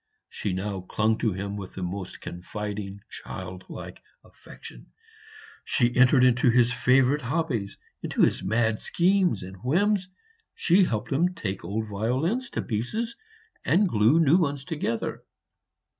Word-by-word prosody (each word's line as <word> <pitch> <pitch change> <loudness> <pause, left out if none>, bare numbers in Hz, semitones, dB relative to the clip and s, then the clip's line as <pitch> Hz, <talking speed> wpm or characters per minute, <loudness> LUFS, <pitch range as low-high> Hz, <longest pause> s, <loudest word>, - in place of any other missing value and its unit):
She 100 - -3
now 95 +1 -3
clung 110 +4 0
to 110 - +1
him 100 +2 -4
with 95 -2 -8
the 95 - -5
most 90 0 -5
confiding 100 +2 -6
childlike - - -8 0.2
affection; - - -13 0.8
she 120 -2 +1
entered 125 +1 +5
into 125 0 +4
his 120 0 +4
favorite 135 +3 +3
hobbies 125 -6 -2 0.2
into - - 0
his - - +2
mad 110 +3 +1
schemes 180 - +1
and 95 +1 -9
whims. 185 - +1 0.5
She 185 +2 +4
helped 110 -5 -3
him 175 +6 +1
take 100 - -4
old 105 +6 -2
violins 130 - -1
to - - 0
pieces 175 - -3 0.5
and 195 +5 +3
glue 115 +3 +4
new 160 +1 +5
ones 140 -5 -1
together. 145 -8 -3
120 Hz, 135 wpm, -26 LUFS, 100-160 Hz, 0.8 s, entered